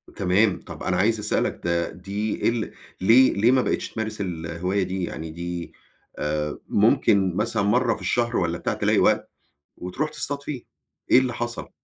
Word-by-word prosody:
تمام، 95 Hz, +2 st, +2 dB
طب -, -, -9 dB
أنا 90 Hz, -, 0 dB
عايز 110 Hz, +4 st, +2 dB
أسألك 105 Hz, 0 st, -1 dB
ده 85 Hz, 0 st, 0 dB
دي 100 Hz, +5 st, -2 dB
ال 115 Hz, -2 st, -3 dB, 0.3 s
ليه 120 Hz, +7 st, +6 dB
ليه 115 Hz, +5 st, +3 dB
ما 130 Hz, -, +4 dB
بقيتش -, -, -1 dB
تمارس 110 Hz, -1 st, -4 dB
الهواية 90 Hz, +2 st, -2 dB
دي، 95 Hz, 0 st, -3 dB
يعني 80 Hz, -2 st, -5 dB
دي 85 Hz, +1 st, -5 dB, 0.5 s
آآ 75 Hz, 0 st, -2 dB
ممكن 95 Hz, -3 st, +3 dB
مثلًا 110 Hz, +1 st, 0 dB
مرّة 115 Hz, +3 st, +2 dB
في -, -, -11 dB
الشهر 120 Hz, -1 st, 0 dB
والّا 85 Hz, -1 st, 0 dB
بتاع -, -, -2 dB
تلاقي -, -, +2 dB
وقت، -, -, +2 dB, 0.5 s
وتروح 130 Hz, +13 st, -3 dB
تصطاد 145 Hz, -2 st, -4 dB
فيه. 140 Hz, -4 st, -5 dB, 0.5 s
إيه -, -, +8 dB
اللي 130 Hz, -2 st, +1 dB
حصل؟ 120 Hz, 0 st, -4 dB
100 Hz, 165 wpm, -24 LUFS, 90-120 Hz, 0.5 s, إيه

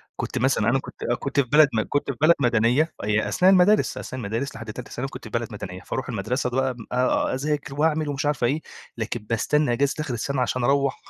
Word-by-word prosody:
كنت -, -, -4 dB
مثلًا 125 Hz, -4 st, +2 dB
أنا 135 Hz, +3 st, +2 dB
كنت -, -, -10 dB
آه -, -, +3 dB
كنت 140 Hz, +2 st, -2 dB
في 135 Hz, -, +3 dB
بلد 150 Hz, +1 st, +7 dB
م 110 Hz, -, +2 dB
كنت 145 Hz, -1 st, 0 dB
في 120 Hz, -, -10 dB
بلد 170 Hz, +2 st, +6 dB
مدنية 120 Hz, +5 st, +2 dB
هي 105 Hz, +1 st, +1 dB
أثناء 185 Hz, +1 st, +4 dB
المدارس، 195 Hz, +3 st, +4 dB
أثناء 130 Hz, -, -6 dB
المدارس 115 Hz, +7 st, -3 dB
لحد 115 Hz, -1 st, -7 dB
تالتة 125 Hz, +3 st, -9 dB
ثانوي 135 Hz, +3 st, -4 dB
كنت -, -, -10 dB
في 110 Hz, -, -8 dB
بلد 115 Hz, +1 st, -2 dB
مدنية. 90 Hz, -3 st, -7 dB
فاروح 130 Hz, -, -4 dB
المدرسة 125 Hz, +4 st, -1 dB
بقى 130 Hz, 0 st, 0 dB, 0.2 s
آآ 125 Hz, +1 st, +1 dB
أذاكر 145 Hz, 0 st, -2 dB
وأعمل 155 Hz, 0 st, +1 dB
ومش 145 Hz, +1 st, -2 dB
عارف 145 Hz, -4 st, 0 dB
إيه، 145 Hz, +6 st, +1 dB, 0.4 s
لكن 115 Hz, +1 st, -3 dB
باستنّى 140 Hz, +4 st, +1 dB
أجازة 140 Hz, +3 st, +1 dB
آخر 145 Hz, -4 st, -2 dB
السَنة 130 Hz, +3 st, -2 dB
عشان 125 Hz, 0 st, -1 dB
أروّح 140 Hz, +1 st, +2 dB
130 Hz, 220 wpm, -24 LUFS, 120-145 Hz, 0.4 s, بلد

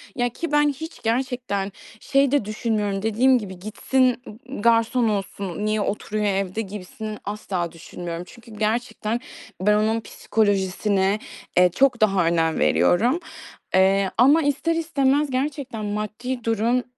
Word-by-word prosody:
Ya, 245 Hz, -2 st, +1 dB
ki 325 Hz, +6 st, -5 dB
ben 295 Hz, 0 st, +4 dB
hiç 320 Hz, +4 st, -7 dB
gerçekten 235 Hz, -4 st, -1 dB, 0.3 s
şey 275 Hz, +1 st, +2 dB
de 285 Hz, -7 st, +2 dB
düşünmüyorum, 210 Hz, -2 st, -1 dB
dediğim 235 Hz, +5 st, +3 dB
gibi, 190 Hz, -5 st, -7 dB
"Gitsin, 250 Hz, +5 st, +1 dB
ımm, 245 Hz, +3 st, -9 dB
garson 230 Hz, +1 st, +3 dB
olsun. 200 Hz, -1 st, -3 dB
Niye 215 Hz, 0 st, +1 dB
oturuyor 210 Hz, +1 st, -2 dB
evde?" 195 Hz, +1 st, 0 dB
gibisini 210 Hz, +1 st, -7 dB
asla 195 Hz, -4 st, -3 dB
düşünmüyorum. 170 Hz, +1 st, -7 dB
Çünkü 235 Hz, +2 st, -15 dB
gerçekten 220 Hz, +1 st, -1 dB, 0.4 s
ben 210 Hz, +2 st, +4 dB
onun 220 Hz, +2 st, +2 dB
psikolojisine, 200 Hz, -1 st, 0 dB, 0.4 s
eee, 180 Hz, 0 st, +7 dB
çok 265 Hz, -4 st, +3 dB
daha 195 Hz, -5 st, +3 dB
önem 165 Hz, -1 st, +1 dB
veriyorum. 240 Hz, -, +3 dB, 0.6 s
Eee, 190 Hz, +1 st, +4 dB
ama 280 Hz, +7 st, +6 dB
ister 290 Hz, +4 st, +1 dB
istemez 290 Hz, -3 st, +1 dB
gerçekten 260 Hz, -4 st, -3 dB
maddi 215 Hz, +4 st, -4 dB
durum 230 Hz, +2 st, +1 dB
215 Hz, 130 wpm, -23 LUFS, 200-255 Hz, 0.6 s, eee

